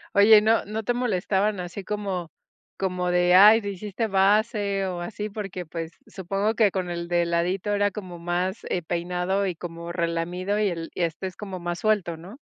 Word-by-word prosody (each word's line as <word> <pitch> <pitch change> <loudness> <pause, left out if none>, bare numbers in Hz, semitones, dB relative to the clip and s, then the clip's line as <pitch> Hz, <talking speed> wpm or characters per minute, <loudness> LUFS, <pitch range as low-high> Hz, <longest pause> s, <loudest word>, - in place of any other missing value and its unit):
Oye, 210 +1 +8
¿no 220 +2 +2
no 215 +2 -4
te 245 - 0
molestaban 205 -4 0
así 180 +2 -7
como 195 -5 -3 0.4
como 180 -2 -1
de: 180 0 +3
"Ay, 210 +4 +8
te 205 - -4
hiciste 205 +3 -3
base", 200 0 +2
o 180 -1 -4
así?, 210 +3 -5
porque, 195 -4 -6
pues, 165 0 -6
supongo 195 +3 -2
que 220 -2 +4
con 185 -2 -2
el 170 0 -4
de 175 0 +1
ladito 175 +4 -1
era 205 0 +2
como 185 -3 -8
más, 180 +4 -2
eh, 180 - 0
peinado 180 +3 -1
y 180 - -3
como 170 0 -7
relamido. 175 +4 -1
Y 210 - +2
el 165 -3 -4
y 180 - -1
este 170 +3 -2
es 185 - -10
como 190 -3 -6
más 175 0 -3
suelto, 205 -6 +1
¿no? 185 +10 -11
190 Hz, 190 wpm, -25 LUFS, 175-205 Hz, 0.4 s, Oye